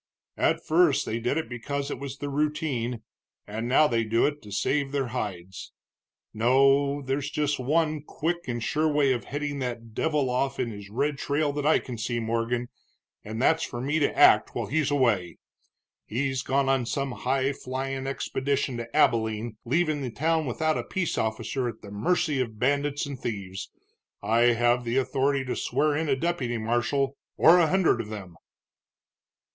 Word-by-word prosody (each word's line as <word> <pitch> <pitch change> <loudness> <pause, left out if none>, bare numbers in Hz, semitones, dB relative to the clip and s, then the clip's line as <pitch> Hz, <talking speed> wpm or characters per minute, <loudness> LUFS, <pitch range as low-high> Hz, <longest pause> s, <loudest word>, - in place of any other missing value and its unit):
"At - - +1
first 165 -2 +3
they 115 - -2
did 125 +5 0
it 160 - -2
because 140 +4 -4
it - - -4
was 140 0 -6
the 145 - -4
routine, 140 -6 -1 0.4
and 110 +3 -4
now 135 +5 +5
they 115 -4 +1
do 115 +1 +2
it 150 0 -1
to 105 - -12
save 140 +7 0
their 135 -3 -1
hides. 95 -6 -5 0.6
No, 135 +5 +3
there's 135 +2 -2
just 150 -2 -1
one 155 +3 +1
quick 170 +4 -3
and 120 -2 -3
sure 155 +5 +1
way 145 -2 +3
of 120 -2 -4
heading 145 0 -3
that 120 -3 -5
devil 150 -1 0
off 135 +1 -1
in 120 -2 -1
his 100 -2 -9
red 140 +6 -1
trail 145 0 0
that 145 0 -1
I 155 - +5
can 120 -3 -6
see, 120 +1 -1
Morgan, 115 +2 -1 0.5
and 110 +2 -6
that's 160 +5 +3
for 120 - -5
me 145 +5 0
to 145 - +2
act - - +6
while - - -1
he's 150 0 0
away. 115 -11 +1 0.7
He's 130 +2 -1
gone 135 +1 +1
on 135 -3 +1
some 140 +1 -2
high 135 +2 0
flyin' 135 +1 -4
expedition 135 -1 -1
to 115 +2 -7
Abilene, 110 -5 +2
leaving 155 +3 +1
the 130 - -3
town 155 +6 0
without 155 +5 0
a - - -3
peace 185 -4 -2
officer 115 +3 -1
at 110 - -10
the 100 - -10
mercy 145 - 0
of 110 -4 -4
bandits 140 +4 0
and 140 -3 -6
thieves. 100 -6 -5 0.5
I 120 +1 +4
have 120 +1 +2
the 120 +2 -1
authority 135 +1 +1
to 125 - -2
swear 150 -1 +1
in 160 0 -1
a 135 - +3
deputy 130 -6 -1
marshal, 120 +5 0 0.2
or 170 +3 +7
a 170 - +4
hundred 185 +1 +2
of 105 - -9
them." 95 -5 -8
135 Hz, 180 wpm, -27 LUFS, 115-145 Hz, 0.7 s, or